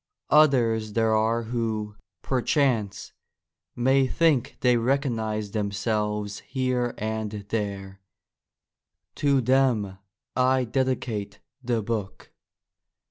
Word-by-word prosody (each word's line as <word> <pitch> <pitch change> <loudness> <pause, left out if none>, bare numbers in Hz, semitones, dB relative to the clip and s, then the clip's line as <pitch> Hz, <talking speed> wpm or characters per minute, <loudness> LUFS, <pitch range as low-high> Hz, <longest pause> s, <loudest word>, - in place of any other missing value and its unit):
Others 115 -8 +4
there 115 0 +2
are 115 +2 +1
who, 110 -2 -3 0.3
perchance, 125 -6 0 0.6
may 130 +2 +3
think 145 -5 +1
they 125 -1 +4
recognise 115 -5 -1
themselves 105 0 -2
here 125 -2 -2
and 110 0 -3 0.2
there: 100 -3 -4 1.1
to 140 -2 +2
them 120 -7 +1 0.4
I 130 0 +3
dedicate 120 -5 -2 0.2
the 120 -3 0
book. 105 -3 -4
115 Hz, 85 wpm, -25 LUFS, 105-130 Hz, 1.1 s, Others